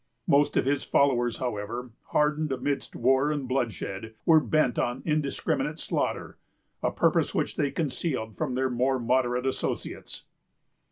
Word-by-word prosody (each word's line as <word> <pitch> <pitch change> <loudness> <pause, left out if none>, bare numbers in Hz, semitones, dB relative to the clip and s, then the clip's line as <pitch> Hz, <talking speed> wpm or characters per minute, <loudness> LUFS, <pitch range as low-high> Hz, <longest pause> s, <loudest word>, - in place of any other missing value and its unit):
Most 145 +1 +3
of - - +3
his 140 +1 +1
followers, 120 -4 +2
however, 120 +1 -4
hardened 150 0 +1
amidst 135 +1 -2
war 135 +4 +3
and 145 -3 -2
bloodshed, 115 -4 -3
were 160 -1 +7
bent 155 -5 +1
on 120 +2 -1
indiscriminate 150 -3 0
slaughter; - - -2 0.4
a - - +2
purpose - - +1
which - - 0
they 145 - +1
concealed 135 - -2
from 125 - -2
their 130 0 0
more 130 +2 +1
moderate 125 +1 +1
associates. 130 - -3
130 Hz, 135 wpm, -27 LUFS, 120-145 Hz, 0.4 s, were